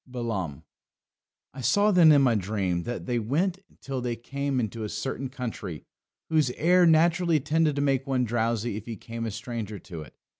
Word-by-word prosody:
Balaam. 115 - -4 0.9
"I 135 - -7
saw 205 - +3
then 175 -5 +7
in 145 -2 +6
my 125 -3 +4
dream 95 -4 -1
that 120 - -4
they 120 -2 0
went 170 - 0 0.2
till 135 -2 -4
they 120 -1 -2
came 140 +3 -2
into 110 -1 -3
a 105 - -3
certain 130 +5 -4
country 115 - -6 0.4
whose 155 -5 +2
air 180 +2 +5
naturally 165 0 +4
tended 155 +1 +1
to 140 - 0
make 135 -1 +1
one 130 -2 +1
drowsy 115 -1 -1
if 110 - -9
he 115 - -4
came 115 +1 -6
a - - -1
stranger 110 -1 -5
to 85 -5 -9
it. 70 -6 -12
125 Hz, 185 wpm, -27 LUFS, 110-145 Hz, 0.9 s, then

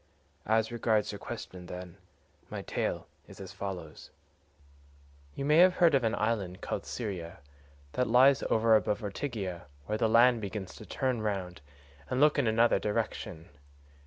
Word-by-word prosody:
As 110 +1 +2
regards 110 -3 +1
your 100 - -7
question, 90 -2 -8
then, 90 -1 -8 0.5
my - - -5
tale - - -2 0.2
is - - -13
as - - -8
follows: 90 -6 -7 1.3
"You 140 - -3
may 150 +2 +4
have 180 +1 +6
heard 170 -3 +4
of 135 -3 +3
an 115 0 +1
island 100 -5 -1
called - - -4
Syra 95 -7 -5 0.6
that 125 - 0
lies 130 +3 +6
over 110 0 +4
above 105 0 +1
Ortygia,134 100 - -4 0.2
where 105 - -2
the 110 - +2
land 120 +1 +5
begins 100 -2 -5
to 110 - -11
turn 130 +2 -1
round 95 -6 -3 0.5
and 125 - -1
look 150 0 +4
in 130 - +2
another 115 +2 +3
direction. 85 -5 -3
110 Hz, 155 wpm, -30 LUFS, 95-120 Hz, 1.3 s, have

